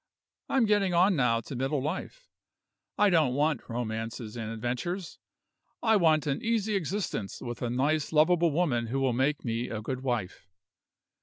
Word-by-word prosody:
I'm 265 -4 +3
getting 200 -4 +2
on 185 +3 +4
now 120 -5 +2
to 130 - -8
middle 135 +3 0
life. 185 - -5 0.7
I 205 -1 +4
don't 155 -7 +3
want 150 -2 0
romances 115 -1 -4
and 110 -2 -4
adventures 125 - -4 0.6
I 220 -2 +4
want 160 -6 +3
an 140 -2 -1
easy 220 -2 0
existence 190 - -2
with 120 -1 -6
a 120 - -1
nice 140 +5 0
lovable 165 +2 +4
woman 140 -8 0
who 135 +4 -1
will 135 -2 +1
make 135 +4 0
me 115 +1 -2
a 110 - -4
good 130 +4 -4
wife. 115 -7 -3
140 Hz, 160 wpm, -29 LUFS, 120-175 Hz, 0.7 s, on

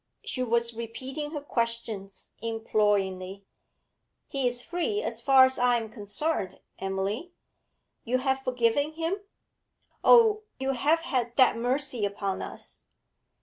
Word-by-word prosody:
She 255 - -2
was 235 -1 +1
repeating 260 +6 -5
her 295 -1 -5
questions 230 -6 -4
imploringly. 205 -4 0 0.8
'He 270 -2 0
is 245 0 -2
free, 410 +5 -1
as - - -3
far 270 -1 +7
as 260 0 +1
I 245 -1 +4
am 225 -2 -5
concerned, 205 - -2 0.2
Emily.' 195 - -3 0.7
'You 250 +2 +1
have 265 +1 0
forgiven 255 +3 +1
him? 330 +4 -1 0.9
Oh, 445 -3 +6 0.2
you 265 0 0
have 295 +6 +2
had 245 -6 -2
that 260 -2 +6
mercy 250 0 -1
upon 200 -1 -2
us?' - - -9
245 Hz, 125 wpm, -28 LUFS, 220-280 Hz, 0.9 s, far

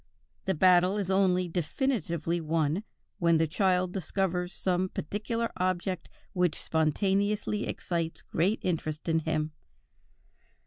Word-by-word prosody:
"The 190 -2 +1
battle 180 +3 +5
is 195 -2 -1
only 185 -2 +3
definitively 170 - -1
won, 160 +3 0 0.4
when 170 -1 +4
the 160 - +3
child 180 +2 +1
discovers 180 0 -1
some 185 0 0
particular 220 +9 -2
object 185 0 -1 0.2
which 180 -4 +1
spontaneously 200 +6 +1
excites 165 -2 -3
great 190 +7 +1
interest 155 -3 -2
in 165 -1 +3
him. 155 -1 -1
180 Hz, 115 wpm, -29 LUFS, 165-195 Hz, 0.4 s, battle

